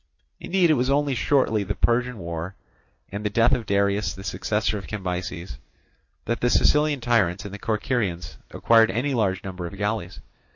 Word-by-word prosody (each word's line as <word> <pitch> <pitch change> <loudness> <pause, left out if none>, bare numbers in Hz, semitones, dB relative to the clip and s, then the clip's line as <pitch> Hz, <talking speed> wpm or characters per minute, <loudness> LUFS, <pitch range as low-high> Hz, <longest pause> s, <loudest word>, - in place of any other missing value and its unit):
Indeed 180 -3 +2
it - - +6
was 130 -2 0
only 140 0 +2
shortly 125 -3 +2
the 95 - -3
Persian 120 +1 +1
war, 85 +1 -5 0.6
and 100 +1 -5
the 105 - 0
death 115 +4 +3
of 125 -5 0
Darius 100 -1 +1
the 95 - -9
successor 105 +2 -1
of 95 - -11
Cambyses, 90 - -5 0.7
that 120 +2 -2
the 120 - +2
Sicilian 150 +1 +3
tyrants 105 -6 +1
and 100 - -7
the 100 - -7
Corcyraeans 105 -5 -2
acquired 115 -2 +4
any 125 +8 -1
large 100 -5 0
number 90 -3 -5
of 100 - -10
galleys. 100 -3 -3
105 Hz, 170 wpm, -24 LUFS, 95-120 Hz, 0.7 s, it